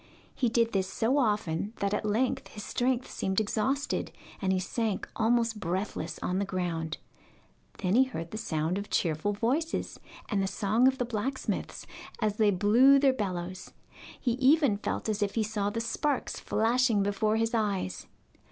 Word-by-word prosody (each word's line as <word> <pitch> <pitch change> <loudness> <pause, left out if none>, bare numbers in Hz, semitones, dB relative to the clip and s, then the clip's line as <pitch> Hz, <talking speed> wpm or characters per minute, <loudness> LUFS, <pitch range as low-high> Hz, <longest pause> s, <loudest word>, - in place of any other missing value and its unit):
He 245 - +1
did 230 0 +2
this 190 -1 -1
so 245 +8 +1
often 210 - 0
that 200 0 -1
at 210 - 0
length 220 +5 0
his 210 - -9
strength 250 +2 0
seemed 190 +1 -1
exhausted, 220 +6 -1 0.3
and 190 - +1
he 190 - +2
sank 215 +2 -2
almost 230 -1 +1
breathless 190 +2 -3
on 180 +1 0
the - - +1
ground. 170 -5 -2 0.8
Then 185 -1 0
he 260 +4 +6
heard 170 -10 -6
the 215 - -5
sound 160 +1 -1
of 205 - -7
cheerful 165 +4 0
voices, 270 +10 -1 0.3
and 200 -2 0
the 195 - 0
song 210 +6 +2
of 265 0 +2
the 245 - -1
blacksmiths 245 +3 -3 0.3
as 215 -2 0
they 215 -2 +4
blew 220 +8 +6
their 275 -1 +4
bellows 185 -5 -4 0.5
he 245 - 0
even 265 -2 +4
felt 210 - -3
as 215 -1 -1
if 200 -1 0
he 225 - +2
saw 205 -1 -1
the 230 - -3
sparks 255 +4 -1
flashing 225 -1 +2
before 205 +2 +1
his 225 +1 0
eyes. 200 - -1
215 Hz, 170 wpm, -29 LUFS, 195-240 Hz, 0.8 s, he